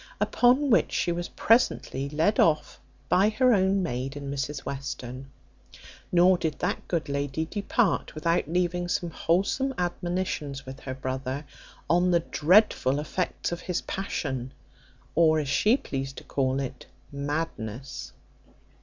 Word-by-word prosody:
Upon 255 +3 +3
which 225 - +4
she 175 - +1
was 175 0 -2
presently 215 - +2
led 160 +8 +1
off 155 -2 +2 0.3
by 195 +3 +4
her 250 +3 +3
own 190 -1 +2
maid 135 -2 -3
and 140 -1 -5
Mrs 140 0 -3
Western: 135 -1 -6 0.8
nor 180 +1 +5
did 155 -3 -2
that - - -2
good 170 -3 -1
lady 140 +2 -2
depart 205 +3 0
without 165 +1 +1
leaving 175 +1 0
some 175 -1 -1
wholesome 200 +13 0
admonitions 175 -6 -2
with 130 +1 -8
her 130 -1 -6
brother, 130 +2 -4 0.4
on 175 +3 +3
the 170 -1 +3
dreadful 160 -5 +3
effects 175 +5 -2
of 175 - -4
his 180 -1 -2
passion, 135 -9 -3 0.6
or, 160 -1 +4
as 150 -2 -1
she 215 - +4
pleased 135 - -5
to - - -8
call 135 -1 0
it, 130 -2 -6 0.2
madness. 140 -4 -4
160 Hz, 135 wpm, -27 LUFS, 135-180 Hz, 0.8 s, nor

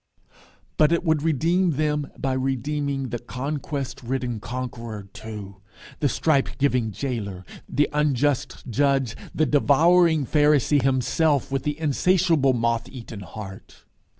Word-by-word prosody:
But 155 +1 +5
it 170 - +2
would 160 -4 +2
redeem 165 +3 +2
them 150 0 -1
by 135 -1 -1
redeeming 135 +1 -1
the 120 +1 -3
conquest 140 0 -4
ridden 125 -2 -3
conqueror 115 -2 -6
too, 105 -3 -8 0.4
the 145 - +2
stripe 140 +2 +2
giving 125 -5 +1
jailer, 100 -6 -4 0.2
the 145 +3 +2
unjust 145 -1 0
judge, 135 -1 +1 0.2
the 155 - +3
devouring 160 +2 +4
Pharisee 145 0 +3
himself 135 +2 +1
with 135 -1 0
the 150 +1 -3
insatiable 160 -2 +3
moth 115 0 0
eaten 115 -4 -9
heart. 95 0 -10
135 Hz, 125 wpm, -24 LUFS, 120-150 Hz, 0.4 s, But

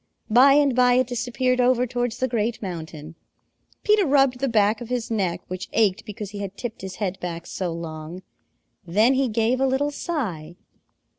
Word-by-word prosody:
By 260 +5 +7
and 285 -3 +3
by 250 0 +4
it 255 +1 +3
disappeared 250 +1 0
over 250 0 +3
towards 245 -1 -2
the 260 - 0
Great 230 -1 -1
Mountain. 160 -5 -7 0.7
Peter 425 -1 +4
rubbed 270 -5 +3
the 275 - 0
back 215 0 +2
of 240 - -7
his 245 -2 -3
neck, 185 -5 -1
which 185 0 -6
ached 215 -1 +2
because 210 -2 -7
he 205 - -7
had 200 -1 -6
tipped 240 -3 -6
his 190 -1 -7
head 195 -1 -3
back 170 -1 -5
so 180 -1 -4
long. 165 +1 -7 0.6
Then 210 +9 +3
he 265 0 +1
gave 230 +3 +1
a 270 - +3
little 275 +3 0
sigh. 190 - -4
225 Hz, 180 wpm, -23 LUFS, 185-255 Hz, 0.7 s, By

